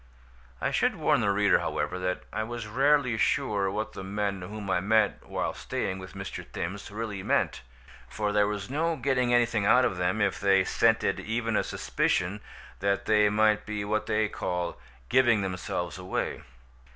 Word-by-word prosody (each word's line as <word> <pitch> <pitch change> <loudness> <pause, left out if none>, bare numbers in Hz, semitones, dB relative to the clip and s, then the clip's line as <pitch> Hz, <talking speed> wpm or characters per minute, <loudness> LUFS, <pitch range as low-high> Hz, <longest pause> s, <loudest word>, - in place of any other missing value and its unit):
I - - -1
should - - +2
warn - - +2
the 100 - +1
reader, 100 0 +3
however, 90 - -2
that 90 0 -2
I - - -1
was 115 0 -5
rarely 130 +1 +2
sure 105 -7 +1
what 105 +3 -3
the - - -7
men 100 0 -2
whom 100 +3 -7
I 95 - +2
met 105 +2 +2
while - - -2
staying 95 0 -3
with 95 +1 -10
Mr. 95 0 -6
Thims 95 +4 -5
really 105 -2 -4
meant; - - 0 0.5
for 105 -1 -2
there 105 0 +3
was 105 -2 -3
no 160 +5 0
getting 130 -4 +1
anything 120 -4 +2
out 125 +3 +6
of 95 -7 -1
them 90 +4 0
if 100 -2 +1
they 95 -1 +4
scented - - +2
even 115 0 -2
a - - +2
suspicion 95 +4 -1 0.4
that 100 0 0
they 105 -1 +4
might 105 0 +2
be 105 -1 -3
what 110 +1 -1
they 110 0 +2
call 90 -4 -3 0.3
"giving 120 - +4
themselves 90 -1 -3
away." 90 0 -3
105 Hz, 175 wpm, -28 LUFS, 95-110 Hz, 0.5 s, out